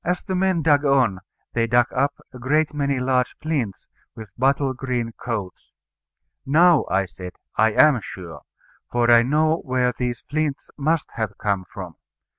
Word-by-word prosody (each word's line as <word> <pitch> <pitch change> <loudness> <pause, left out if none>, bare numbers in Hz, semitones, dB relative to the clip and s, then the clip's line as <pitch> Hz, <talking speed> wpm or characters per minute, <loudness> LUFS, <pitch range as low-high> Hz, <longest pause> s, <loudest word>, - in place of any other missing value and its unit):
As 180 +1 -1
the 190 - -4
men 185 -3 +1
dug 145 -1 +4
on, 130 -9 +2 0.3
they 115 -1 +1
dug 120 +1 +4
up 140 +2 0 0.2
a 125 - -10
great 150 +5 +1
many 140 -2 -1
large 125 -1 0
flints, 140 -11 -3 0.3
with 110 -4 -10
bottle 135 +1 +1
green 125 -3 -3
coats. 110 -6 -6 0.7
"Now," 165 +2 +4
I 95 +2 +1
said, 90 +1 -10 0.2
"I 110 0 +3
am 145 -3 +5
sure. 90 -4 -9 0.5
For 120 0 +2
I 120 0 +7
know 155 +6 +2
where 125 -4 0
these 125 -2 -3
flints 150 -1 -2
must 155 +2 0
have 110 -3 -3
come 100 -3 -1
from." 90 -5 -8
130 Hz, 160 wpm, -22 LUFS, 115-150 Hz, 0.7 s, I